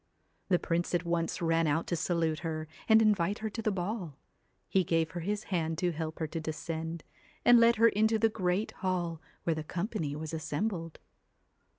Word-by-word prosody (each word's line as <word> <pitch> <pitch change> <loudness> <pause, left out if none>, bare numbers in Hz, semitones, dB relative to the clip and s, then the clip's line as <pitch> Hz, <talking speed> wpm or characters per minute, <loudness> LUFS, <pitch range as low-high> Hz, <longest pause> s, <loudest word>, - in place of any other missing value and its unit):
The 180 - +5
prince 175 +1 -1
at 175 0 0
once 170 0 -1
ran 165 0 +2
out 155 +3 +1
to 175 - -1
salute 165 -1 0
her 155 -2 -4 0.2
and 220 0 +7
invite 205 -2 +2
her 220 0 -4
to 225 - -4
the 215 - +1
ball. 185 - -3 0.5
He 190 - +2
gave 165 -2 +1
her 175 - -4
his 205 +5 -2
hand 165 -2 0
to 175 +1 +1
help 160 0 -4
her 160 - -1
to 160 +1 -4
descend, 160 +1 -4 0.4
and 240 -1 +8
led 230 0 +6
her 230 +1 +6
into 220 +1 +2
the 225 +1 +4
great 190 -1 -1
hall 175 -4 -2 0.2
where 165 - +1
the 155 -1 -4
company 170 -3 -3
was 155 +1 -5
assembled. 165 +2 -3
170 Hz, 190 wpm, -31 LUFS, 160-205 Hz, 0.5 s, and